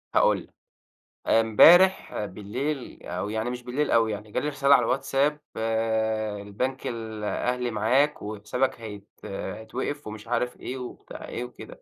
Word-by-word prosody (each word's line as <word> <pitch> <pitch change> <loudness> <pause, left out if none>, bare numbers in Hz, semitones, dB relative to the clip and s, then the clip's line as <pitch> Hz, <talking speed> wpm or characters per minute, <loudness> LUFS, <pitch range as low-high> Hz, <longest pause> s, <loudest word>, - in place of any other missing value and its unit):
هاقول - - +5
لك، - - -23 0.7
إمبارح 160 - +6
بالليل 125 +9 -4
أو 105 - -4
يعني 110 +2 -1
مش 125 0 -5
بالليل 135 +5 -1
أوي 115 -1 +4
يعني 105 0 -6
جالي 150 - -1
رسالة 140 0 +5
على 125 - +3
الواتساب، 140 +3 +1 1.0
البنك 125 +7 -3
الأهلي 115 +2 -2
معاك، 130 +8 +2
وحسابك 110 +4 -2
هيت 105 -2 -8 0.2
هيتوقف 110 +9 -5
ومش 105 +1 -8
عارف 120 +1 -1
إيه، 130 - -5
وبتاع 125 -1 -8
إيه 120 - -4
وكده. 125 - -11
120 Hz, 130 wpm, -26 LUFS, 110-135 Hz, 1.0 s, إمبارح